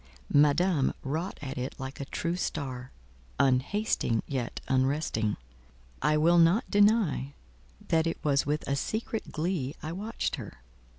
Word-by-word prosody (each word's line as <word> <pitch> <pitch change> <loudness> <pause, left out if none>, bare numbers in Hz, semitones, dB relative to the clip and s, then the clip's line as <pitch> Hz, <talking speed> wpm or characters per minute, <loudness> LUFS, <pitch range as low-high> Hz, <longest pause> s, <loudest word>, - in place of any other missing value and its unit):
Madame 150 +1 +4
wrought 160 +7 -3
at 135 -2 -4
it 125 +2 -4
like 130 +1 -6
a 140 - -4
true 170 +5 -2
star, 130 -7 -4 0.5
"unhasting 135 - +1
yet 130 -4 -3
unresting." 130 -5 +1 0.6
I 150 +2 +3
will 170 +3 +5
not 170 +7 +4
deny 205 - +3 0.5
that 160 0 +3
it 165 - -1
was 140 -2 +3
with 150 +2 -2
a 140 - +1
secret 220 +8 -3
glee 155 -4 -2
I 155 - -3
watched 205 +6 -3
her. 60 -1 -10
150 Hz, 135 wpm, -29 LUFS, 135-175 Hz, 0.6 s, will